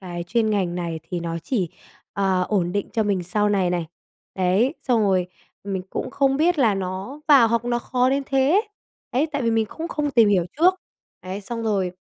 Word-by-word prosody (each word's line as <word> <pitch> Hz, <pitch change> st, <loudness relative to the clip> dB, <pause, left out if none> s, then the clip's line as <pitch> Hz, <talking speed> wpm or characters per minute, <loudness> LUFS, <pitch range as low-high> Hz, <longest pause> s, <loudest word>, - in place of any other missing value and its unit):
cái 175 Hz, -2 st, -6 dB
chuyên 220 Hz, +3 st, +1 dB
ngành 185 Hz, -4 st, 0 dB
này 170 Hz, -2 st, -4 dB
thì 175 Hz, -, -3 dB
nó 170 Hz, 0 st, -3 dB
chỉ, 185 Hz, +1 st, -2 dB, 0.4 s
ờ, 190 Hz, -2 st, +1 dB
ổn 180 Hz, -4 st, 0 dB
định 205 Hz, 0 st, -2 dB
cho 225 Hz, -, +1 dB
mình 200 Hz, -3 st, 0 dB
sau 205 Hz, +4 st, 0 dB
này 195 Hz, -3 st, +1 dB
này, 175 Hz, -2 st, -1 dB, 0.5 s
đấy. 195 Hz, -, +2 dB
Xong 245 Hz, -4 st, +2 dB
rồi 190 Hz, -4 st, +2 dB, 0.4 s
mình 195 Hz, -2 st, -3 dB
cũng -, -, -4 dB
không 270 Hz, -1 st, +2 dB
biết 330 Hz, +3 st, +2 dB
là 225 Hz, -7 st, +4 dB
nó 190 Hz, +9 st, -5 dB
vào 265 Hz, -6 st, +7 dB
học 235 Hz, 0 st, 0 dB
nó 240 Hz, 0 st, 0 dB
khó 255 Hz, +1 st, +1 dB
đến 275 Hz, +1 st, +1 dB
thế, 275 Hz, +9 st, +3 dB, 0.5 s
đấy, 270 Hz, +6 st, +2 dB
tại 285 Hz, -2 st, -1 dB
vì 230 Hz, -, +1 dB
mình 225 Hz, -1 st, +1 dB
cũng 330 Hz, +8 st, -6 dB
không 295 Hz, -2 st, -2 dB
tìm 230 Hz, -5 st, +5 dB
hiểu 185 Hz, -4 st, +3 dB
trước. 365 Hz, +3 st, +5 dB, 0.5 s
Đấy, 185 Hz, +2 st, -5 dB
xong 230 Hz, +3 st, -5 dB
rồi 195 Hz, -5 st, 0 dB
210 Hz, 210 wpm, -23 LUFS, 185-255 Hz, 0.5 s, vào